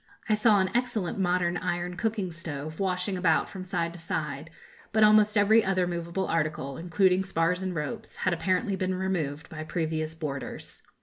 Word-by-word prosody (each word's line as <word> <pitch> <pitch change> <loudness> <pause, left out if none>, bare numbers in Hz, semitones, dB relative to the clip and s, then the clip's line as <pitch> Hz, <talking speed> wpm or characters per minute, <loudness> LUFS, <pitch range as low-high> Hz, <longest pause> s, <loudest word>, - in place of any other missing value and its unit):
I 215 - +3
saw 210 -1 +4
an 190 -1 +1
excellent 230 -7 -1
modern 180 -1 +1
iron 175 0 -2
cooking 205 -2 -1
stove 155 -2 -6
washing 185 0 -1
about 165 -3 +3
from 190 -2 -6
side 175 -3 -2
to 175 - -9
side; 150 -2 -3 0.4
but 220 0 +4
almost 210 0 +6
every 215 +2 +5
other 185 -2 +1
moveable 170 +1 -2
article, 150 -4 -1
including 180 +4 +2
spars 180 -1 0
and 185 -1 -3
ropes, 150 -2 -5
had 185 - 0
apparently 185 +5 0
been 185 0 -1
removed 165 -6 -2
by 155 -1 -5
previous 160 -1 -2
boarders. 145 -4 -6
180 Hz, 170 wpm, -28 LUFS, 165-190 Hz, 0.4 s, almost